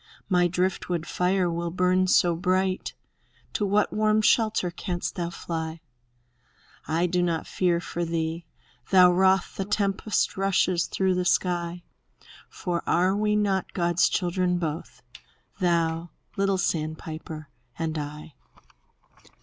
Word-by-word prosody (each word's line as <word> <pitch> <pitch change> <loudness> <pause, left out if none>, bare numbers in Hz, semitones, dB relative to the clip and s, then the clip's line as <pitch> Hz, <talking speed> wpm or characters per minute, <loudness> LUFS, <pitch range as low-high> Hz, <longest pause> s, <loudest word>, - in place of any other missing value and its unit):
My 180 -2 +4
driftwood 180 -1 -1
fire 180 +2 +1
will 170 0 -2
burn 185 +1 +2
so 175 -2 +4
bright! 185 +1 0 0.6
To 205 - 0
what 205 +1 +2
warm 215 0 +2
shelter 215 -6 +2
canst 175 0 -4
thou 170 -3 -3
fly? 165 -1 -5 1.1
I 165 +2 +1
do 180 0 +1
not 170 -2 0
fear 175 -2 +1
for 175 0 -4
thee, 165 0 -3 0.4
though 180 -2 +7
wroth 190 +1 +2
The 195 - -1
tempest 200 +1 0
rushes 185 -2 +1
through 190 -1 +1
the 180 0 0
sky; 175 -1 0 0.7
For 175 -2 -3
are 185 +3 +3
we 210 0 +1
not 195 -3 0
God's 175 -1 +2
children 180 0 0
both. 155 -6 -5 0.6
Thou, 170 -2 +1 0.3
little 195 -1 +1
sandpiper, 155 -2 -4 0.3
and 160 -1 -2
I? 150 +1 -7
180 Hz, 125 wpm, -26 LUFS, 170-190 Hz, 1.1 s, though